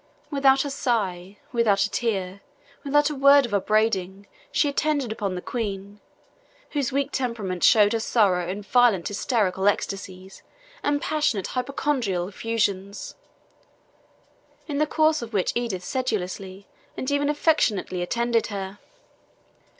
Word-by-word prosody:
Without 275 -1 +4
a 285 - -3
sigh, 205 -8 -2 0.2
without 215 -4 +3
a 205 - -2
tear, 195 -5 -2 0.4
without 295 +1 +2
a - - -4
word 280 0 +6
of 230 - -7
upbraiding, 200 -2 0 0.3
she - - +2
attended 285 -3 0
upon 200 -4 -3
the 180 - -6
Queen, 200 -3 -4 0.7
whose 280 -4 -1
weak 275 +1 -1
temperament 215 -8 -3
showed 210 -1 +6
her 230 - +1
sorrow 195 -6 +2
in 200 +2 -4
violent 230 -5 +3
hysterical 200 -3 0
ecstasies 190 -2 -3 0.4
and 290 0 0
passionate 295 -11 0
hypochondriacal 250 -8 -1
effusions, 200 -2 -2 1.5
in 290 -2 -2
the 305 - +2
course 310 0 +2
of 235 -1 -8
which 190 -3 +1
Edith 230 -7 -2
sedulously 195 -6 -3 0.3
and 260 - -3
even 285 0 +1
affectionately 290 - +1
attended 235 +5 0
her. 195 -1 -6
220 Hz, 125 wpm, -24 LUFS, 195-270 Hz, 1.5 s, word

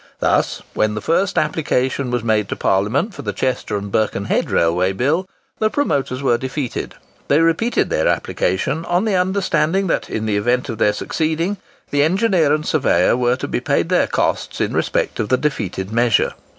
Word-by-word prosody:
Thus, - - +1
when 110 0 0
the - - -2
first 185 - 0
application 140 -4 0
was 120 -2 -1
made 110 -3 +1
to - - -2
Parliament 105 - 0
for - - -8
the 105 - -4
Chester 110 -1 -1
and 100 0 -6
Birkenhead 110 0 0
Railway 90 +3 +2
Bill, 155 - 0 0.3
the 215 - +2
promoters 140 - -1
were 120 -3 +2
defeated. 130 0 -4 0.3
They 145 - +4
repeated 165 +9 +1
their 80 - +1
application, 95 - -1
on 175 +4 +1
the 215 - 0
understanding 185 -1 +1
that 175 - -1
in 110 0 -3
event 120 +5 0
of 115 -2 -5
their 105 -2 +3
succeeding, 165 - -1 0.3
the 145 - +2
engineer 180 -1 +2
and 155 0 0
surveyor 145 -5 +2
were 125 0 +2
to - - -5
be - - -1
paid - - 0
their - - +3
costs - - -1
in - - -1
respect - - -1
of 105 - -1
the 130 - +3
defeated 105 -9 -3
measure. 115 0 +2
130 Hz, 175 wpm, -19 LUFS, 110-165 Hz, 0.3 s, They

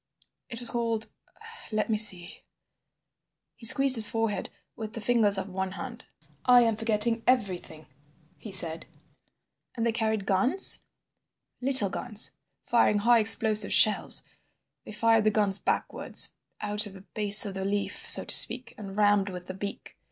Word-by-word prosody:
It 230 -2 -10
was 240 -2 -5
called—let 230 - -6
me 220 - -3
see—" 185 -5 +1 1.1
He 230 - -4
squeezed 270 +1 +6
his 215 -2 +10
forehead 225 -4 -5 0.3
with 220 -1 -10
the 230 - -6
fingers 215 -3 +2
of 190 - -7
one 190 0 -7
hand. 245 +4 -12 0.4
"I 245 -1 +3
am 225 -2 -2
forgetting 225 +1 -3
everything," 185 -10 -4 0.5
he 215 - -14
said. 165 -4 -2 0.9
"And 230 -2 -5
they 230 - -1
carried 220 -3 -5
guns?" 200 - +1 0.8
"Little 255 -7 +1
guns, 215 -1 -2 0.3
firing 230 -3 -1
high 235 +3 +1
explosive 220 -1 +4
shells. 215 - +2 0.6
They - - -12
fired 225 +1 -1
the 215 - 0
guns 205 -2 -1
backwards, - - -2 0.3
out 210 0 0
of 200 - -15
the 190 - -15
base 210 +1 +5
of 200 - -8
the 190 0 -8
leaf, 200 +1 -6
so - - +7
to - - -3
speak, 255 0 +2
and 195 -1 -12
rammed 205 -1 -1
with 180 -1 -11
the 185 - -10
beak. 200 +1 -11
215 Hz, 150 wpm, -24 LUFS, 200-230 Hz, 1.1 s, his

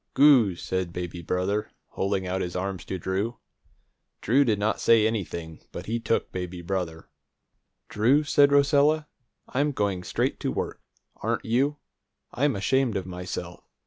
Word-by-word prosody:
"Goo!" 130 -9 +6
said 95 0 -3
baby 90 -1 -5
brother, 90 +5 -1 0.2
holding 95 -1 -1
out 95 +1 -1
his 90 - -4
arms 95 0 -3
to 95 - -4
Drew. 95 +7 -2 0.8
Drew 130 +6 +4
did 110 -6 +1
not 105 +2 0
say 115 -2 +5
anything, 85 -7 -3
but 90 - -7
he 115 +2 -1
took 115 - -1
baby 90 -1 -5
brother. 85 -3 -3 0.8
"Drew," 125 +8 +3
said 145 -1 +4
Rosella, 145 +2 +4 0.4
"I'm 145 +3 +1
going 100 -8 -1
straight - - -1
to - - -1
work. - - -4 0.4
Aren't - - -2
you? 135 +6 +1 0.5
I'm 140 +1 +1
ashamed 120 +2 +1
of 95 - -4
myself. 90 0 -6
105 Hz, 145 wpm, -26 LUFS, 90-130 Hz, 0.8 s, Goo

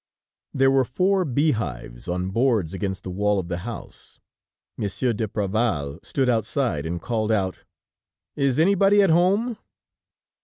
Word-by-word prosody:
There 135 0 +3
were 135 -1 +4
four 185 +10 +1
bee 145 +3 +2
hives 60 - -5
on 90 +1 -2
boards 115 -7 +1
against 95 0 -3
the 90 - -5
wall 105 +2 +1
of 90 -3 -3
the 85 0 -2
house. 115 +5 -9 0.6
Monsieur 115 +4 -1
d'Apreval 105 -8 -1
stood 135 -2 -1
outside 110 - 0
and 85 +1 -3
called 110 +2 -1
out: 95 -4 0 0.8
"Is 140 -2 +1
anybody 195 +4 +4
at 190 - +3
home?" 200 +8 +2
110 Hz, 140 wpm, -24 LUFS, 95-140 Hz, 0.8 s, were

